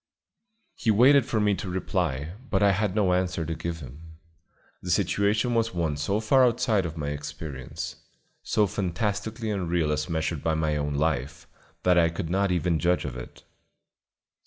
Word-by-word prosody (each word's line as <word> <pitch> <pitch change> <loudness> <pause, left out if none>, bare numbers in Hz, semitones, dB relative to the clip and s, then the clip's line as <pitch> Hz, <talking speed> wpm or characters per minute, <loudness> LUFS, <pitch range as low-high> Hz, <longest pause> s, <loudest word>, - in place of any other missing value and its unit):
He - - -2
waited 130 +5 +6
for 115 - 0
me 105 -1 +3
to 95 0 -4
reply, 85 -5 -2 0.2
but 95 0 +2
I 100 - +6
had 100 0 0
no 100 -4 +3
answer 90 -2 0
to 80 - -3
give 85 0 -5
him. 80 +5 -12 0.6
The - - -7
situation 105 +4 +1
was 115 -4 0
one 80 -4 0
so 90 +8 -1
far 130 +4 +4
outside 115 -6 +2
of 80 0 -8
my 75 -2 -2
experience, 70 -2 -6 0.4
so 105 - +2
fantastically 105 +4 -2
unreal 85 -5 0
as 75 0 -1
measured 80 -2 -2
by 80 -1 +1
my 80 -1 0
own 75 -1 -2
life, 75 0 -1 0.4
that 90 -1 +5
I 85 -1 +4
could 85 0 -4
not 100 +1 +1
even 90 -2 +1
judge 90 -2 +1
of 65 -3 -5
it. 60 - -10
90 Hz, 170 wpm, -26 LUFS, 80-105 Hz, 0.6 s, waited